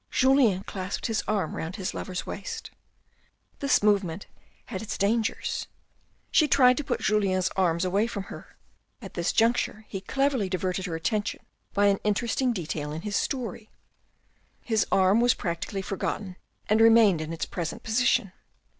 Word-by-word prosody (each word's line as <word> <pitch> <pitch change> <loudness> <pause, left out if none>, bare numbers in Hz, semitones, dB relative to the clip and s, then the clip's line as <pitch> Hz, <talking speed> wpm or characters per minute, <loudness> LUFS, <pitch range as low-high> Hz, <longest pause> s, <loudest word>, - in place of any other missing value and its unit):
Julien 255 -8 +3
clasped 185 -1 -5
his 225 -2 0
arm 200 -7 -1
round 165 +4 -4
his 190 -4 -3
love's 185 -1 -4
waist. 460 -2 -6 0.9
This 275 -6 +2
movement 200 -4 +1 0.4
had 190 -6 -5
its 220 - -5
dangers. 220 +3 0 0.6
She 305 - +4
tr 280 -1 +3
ed 250 0 +7
to 295 - -1
put - - -2
Julien's 190 -3 +2
arms 175 -2 +1
away 200 +5 +1
from 200 -4 -4
her; - - -11 0.4
at 195 -7 -10
this 170 -1 0
juncture 225 -2 +1
he 195 - -5
cleverly 265 -1 0
diverted 185 0 -2
her 165 - -3
attention 205 +6 -2 0.3
by 205 - +4
an 200 -1 +3
interesting 235 +4 +1
detail 155 -7 -4
in 160 +3 -6
his 210 -1 -3
story. 230 -5 -3 1.0
The 220 -3 +3
arm 195 +4 +4
was 245 0 +4
practically 180 +2 -3
forgotten 190 0 -3 0.3
and 215 +1 +3
remained 225 -7 +6
in 155 +1 -5
its 165 -2 -3
present 170 -2 -5
position. 225 -4 +2
205 Hz, 155 wpm, -27 LUFS, 185-230 Hz, 1.0 s, ed